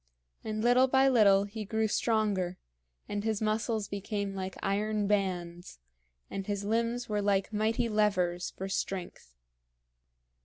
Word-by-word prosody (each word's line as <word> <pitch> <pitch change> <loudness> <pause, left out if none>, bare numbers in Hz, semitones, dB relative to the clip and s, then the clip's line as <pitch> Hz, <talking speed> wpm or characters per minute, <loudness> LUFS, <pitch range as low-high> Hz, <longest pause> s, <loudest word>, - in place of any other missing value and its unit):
And 215 0 -3
little 245 +2 +5
by 265 +1 +4
little 205 -6 +5
he 210 +2 -6
grew 220 +2 0
stronger, 205 -5 0 0.5
and 205 0 -3
his 220 -2 0
muscles 215 -1 -1
became 200 0 -3
like 190 -1 -5
iron 210 +1 0
bands, 180 -4 -2 0.5
and 195 -1 -5
his 205 -1 -2
limbs 230 +3 -1
were 210 -1 -1
like 200 +1 +1
mighty 220 +3 +1
levers 185 -5 +1
for 190 - -6
strength. 185 - -4
205 Hz, 130 wpm, -30 LUFS, 195-220 Hz, 0.5 s, little